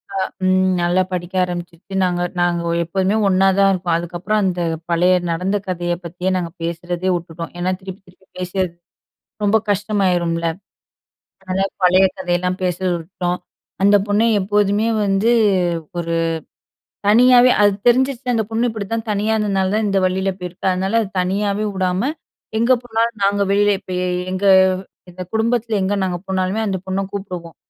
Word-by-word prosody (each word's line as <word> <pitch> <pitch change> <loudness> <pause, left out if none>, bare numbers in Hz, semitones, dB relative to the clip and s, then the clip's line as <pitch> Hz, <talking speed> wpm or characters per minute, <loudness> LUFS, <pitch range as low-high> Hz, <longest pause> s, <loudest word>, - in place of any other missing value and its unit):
அ - - 0 0.3
ம் 185 0 +3
நல்லா 175 +2 +2
படிக்க 180 +1 -4
ஆரம்பிச்சுடுச்சு. 175 +2 -6
நாங்க 175 -1 0 0.2
நாங்க 175 -1 +1 0.2
எப்போதுமே 190 +4 0
ஒண்ணாத 195 0 +3
இருப்போம் 175 -3 0
அதுக்கப்புறம் 175 +5 -2
அந்த 180 -2 0 0.3
பழைய 175 +2 +4 0.2
நடந்த 185 +5 0
கதைய 175 -1 -1
பத்தி 180 +2 -2
நாங்க 170 -2 -3
பேசுகிறதே 175 +2 -2
வுட்டுட்டோம். 170 -1 -6
ஏன்னா, 185 +1 0
திருப்பி 190 +1 -9
திருப்பி 185 +1 -22
பேசி 180 +1 -5
அது 180 - -4 0.7
ரொம்ப 205 +2 +4
கஷ்டமாயிரும்ல. 185 -5 0 1.0
அதனால 190 +1 0 0.2
பழைய 185 +1 +5
கதையெல்லா 180 0 0
பேசர 180 +1 -1
விட்டோம். 180 +1 -3 0.4
அந்த 200 +1 +6
பொண்ணு 205 +2 +2 0.2
எப்போதுமே 205 +2 +1 0.2
வந்து 200 +3 +2 0.7
ஒரு 170 -1 -2 1.0
தனியாவே 250 +3 +6
அது 205 -1 +5 0.2
தெரிஞ்சுச்சு 255 +1 +2
அந்த 220 - +1
பொண்ணு 230 +2 +1
இப்படிதான் 220 +1 -4
தனியா 210 +2 0
இந்ததுனால 195 -2 0
தான் 215 -1 +1
இந்த 195 -1 +2
வலியில 190 +1 0
போயிருக்கு. 180 +1 -6
அதனால, 190 +4 -1 0.2
தனியாவே 200 +3 0
உடாம 190 +8 0 0.5
எங்க 235 +3 +3
போனாலும் 230 -1 -1
நாங்க 200 0 +2
வெளியில 205 +1 +3 0.2
போய் 180 -1 -2 0.3
எங்க 185 +2 -3 0.7
இந்த 185 +1 -8
குடும்பத்தில 225 0 0
எங்க 190 +2 0
நாங்க 185 -2 -1
போனாலுமே 190 +2 -1
அந்த 195 -2 -1
பொண்ண 190 +1 -1
கூப்பிடுவோம். 180 -4 -6
190 Hz, 140 wpm, -19 LUFS, 180-205 Hz, 1.0 s, அந்த